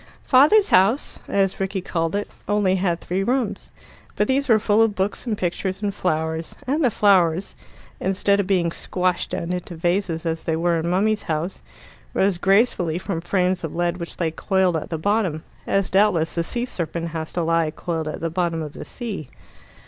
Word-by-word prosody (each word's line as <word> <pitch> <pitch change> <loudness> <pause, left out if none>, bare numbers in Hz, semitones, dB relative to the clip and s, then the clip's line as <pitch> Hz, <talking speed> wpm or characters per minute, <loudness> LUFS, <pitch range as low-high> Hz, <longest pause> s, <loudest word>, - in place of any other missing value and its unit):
"Father's 300 +11 +5
house," 200 +9 +3
as 195 -1 +1
Rickie 195 0 -1
called 165 -1 -1
it, 205 - -1 0.2
only 205 -2 +2
had 175 -2 0
three 185 +3 -2
rooms, 245 0 -1 0.5
but 210 - +1
these 275 +1 +1
were 225 - +7
full 215 0 +2
of 225 -2 +3
books 195 +6 -2
and 215 -3 -1
pictures 185 +2 -2
and 200 -1 0
flowers; 160 -3 -2
and 295 +5 0
the 250 - +5
flowers, 190 -4 +3 0.4
instead 195 +1 +1
of 200 - 0
being 180 -4 +2
squashed 180 +1 -1
down 170 +2 -3
into 180 -1 -5
the - - -13
vases 175 -1 0
as 165 -1 -2
they 160 - 0
were 170 0 +1
in 165 +1 -2
mummy's 205 +4 +2
house, 165 +2 -3 0.5
rose 190 -2 +2
gracefully 195 -4 +2
from 180 -2 -3
frames 180 0 0
of 160 - -4
lead 175 0 0
which 170 -1 -7
lay 165 -2 0
coiled 190 +1 +1
at 160 - -3
the 165 - -2
bottom, 185 -3 0 0.2
as 195 -1 +1
doubtless 190 -5 +3
the 170 - 0
sea 240 +8 -3
serpent 170 -6 -4
has 160 -1 -5
to 175 - 0
lie, 165 -1 +2
coiled 160 0 -4
at 155 - -5
the 165 -1 -2
bottom 170 -2 -1
of 150 -1 -7
the - - -8
sea. 210 - -6
185 Hz, 195 wpm, -22 LUFS, 165-205 Hz, 0.5 s, were